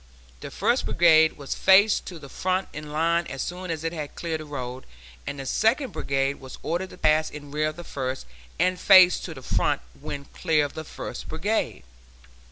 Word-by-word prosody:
The - - -7
First - - +1
Brigade 160 -2 +5
was 140 -2 -4
faced 200 +3 +4
to 175 - -7
the 145 -3 -11
front 185 +6 -1
in 150 0 -7
line 170 +2 +1
as 135 - -4
soon 180 +1 -6
as 160 -1 -3
it 165 +1 -2
had 150 -3 -6
cleared 165 -2 -3
the 155 - -8
road, 130 -3 -6 0.4
and 145 - -4
the 135 - -5
Second 225 - +1
Brigade 135 -2 -1
was 130 -1 -10
ordered 175 +3 -2
to - - -13
pass 155 0 +3
in 145 -1 -10
rear 155 +1 0
of 155 - -4
the 175 - -9
first 130 -4 -4 0.3
and 185 0 +1
face 185 -2 +7
to - - -7
the - - -11
front - - 0 0.2
when 140 - -6
clear 155 -3 +1
of 145 - -7
the 160 - -6
First - - -7
Brigade. 160 - -2
155 Hz, 200 wpm, -25 LUFS, 145-180 Hz, 0.4 s, face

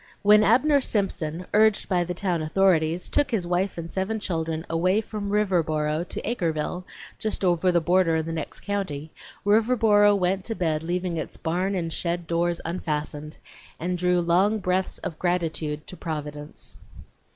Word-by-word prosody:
When 210 +1 +7
Abner 275 +7 +4
Simpson, 180 -7 -1
urged 215 0 +4
by 180 -3 +2
the 180 +1 -4
town 175 -3 -1
authorities, 165 0 +2
took 290 - +1
his 220 -8 0
wife 180 +2 -1
and 170 - -4
seven 200 +4 -1
children 160 -4 -3
away 185 +5 +2
from 210 -2 -5
Riverboro 165 -6 +1
to - - -5
Acreville, 180 -5 -2 0.3
just 215 -2 -1
over 180 0 +3
the 175 - +3
border 175 0 +3
in 160 -1 0
the 165 - -4
next 160 -2 -5
county, 160 -7 -3 0.3
Riverboro 210 -1 +4
went 190 +1 0
to 225 - -3
bed 160 -5 0
leaving 175 +1 -2
its 160 - -4
barn 180 +4 -1
and 165 -3 -2
shed 170 0 -2
doors 170 +1 0
unfastened, 155 -2 -4 0.4
and 180 +2 -1
drew 180 0 +2
long 185 +6 +3
breaths 185 -1 -1
of 160 - -6
gratitude 160 -4 -1
to - - -9
Providence. 150 -3 -6
180 Hz, 160 wpm, -25 LUFS, 160-200 Hz, 0.4 s, When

